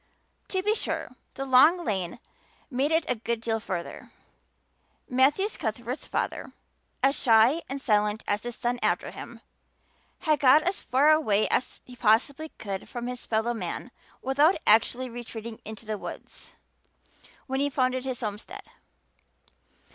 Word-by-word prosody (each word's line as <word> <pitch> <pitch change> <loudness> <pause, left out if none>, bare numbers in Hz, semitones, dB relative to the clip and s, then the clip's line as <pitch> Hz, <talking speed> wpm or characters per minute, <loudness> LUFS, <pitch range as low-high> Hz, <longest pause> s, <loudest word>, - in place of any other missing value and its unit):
To 375 -1 -2
be 420 +2 +3
sure, 440 - -3 0.2
the 270 - -4
long 295 +7 +5
lane 185 -5 -2 0.5
made 270 +4 0
it 320 0 +2
a - - +2
good 235 0 -3
deal 225 0 -1
further. 180 -5 -6 1.0
Matthew 275 +10 +3
Cuthbert's 240 - -4
father, - - -3 0.5
as 275 +1 +4
shy 235 +6 +4
and 275 +1 -3
silent 210 -4 +1
as 205 +1 +1
his 240 0 -6
son 245 0 -2
after - - 0
him, - - -10 0.8
had 310 -3 +2
got 285 +3 +6
as 365 +4 -1
far 275 +4 +4
away 215 -10 +3
as - - -1
he 250 - -12
possibly 250 +7 +2
could 195 -2 -5
from 240 -1 -5
his 250 0 -6
fellow 225 +2 0
men 220 +3 -5 0.3
without 285 +7 +4
actually 230 +4 +4
retreating 230 -2 -8
into 220 +1 -9
the 215 -1 -3
woods - - -9 0.9
when 265 0 -2
he 285 +1 +1
founded 255 -2 0
his 260 -2 -4
homestead. 210 -2 -6
250 Hz, 145 wpm, -27 LUFS, 220-280 Hz, 1.0 s, got